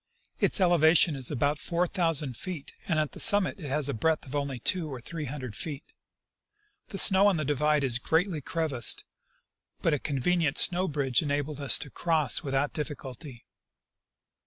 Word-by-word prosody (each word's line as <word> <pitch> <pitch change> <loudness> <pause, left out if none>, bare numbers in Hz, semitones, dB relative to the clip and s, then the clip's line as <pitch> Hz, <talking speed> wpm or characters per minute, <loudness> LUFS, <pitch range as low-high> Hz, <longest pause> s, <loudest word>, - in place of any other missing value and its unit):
Its - - +3
elevation 170 -3 +4
is 130 -3 -4
about 145 +2 -1
four 170 +1 -1
thousand 165 -7 0
feet, 175 0 -7
and 170 -5 0
at 155 -1 -1
the - - -11
summit 205 -2 +4
it 150 -5 -7
has 145 +1 +1
a 140 - -2
breadth 160 +8 -1
of 135 +1 -8
only 140 -2 -3
two 160 +5 +1
or 130 - -6
three 155 +5 -7
hundred 130 -5 -7
feet. 145 +1 -6 1.0
The 195 - -7
snow 195 +1 +6
on 195 -4 +2
the 155 - -2
divide 150 +1 +1
is 125 -2 +2
greatly 160 +3 0
crevassed, 140 -6 -2 0.8
but 165 - +2
a 145 - 0
convenient 150 +3 -1
snow 180 +1 +4
bridge 140 -5 0
enabled 145 -1 -3
us 140 - +5
to 145 - -8
cross 160 -6 0
without 140 -1 -2
diffi 150 -1 -4
culty. 130 -1 -11
150 Hz, 175 wpm, -27 LUFS, 135-165 Hz, 1.0 s, snow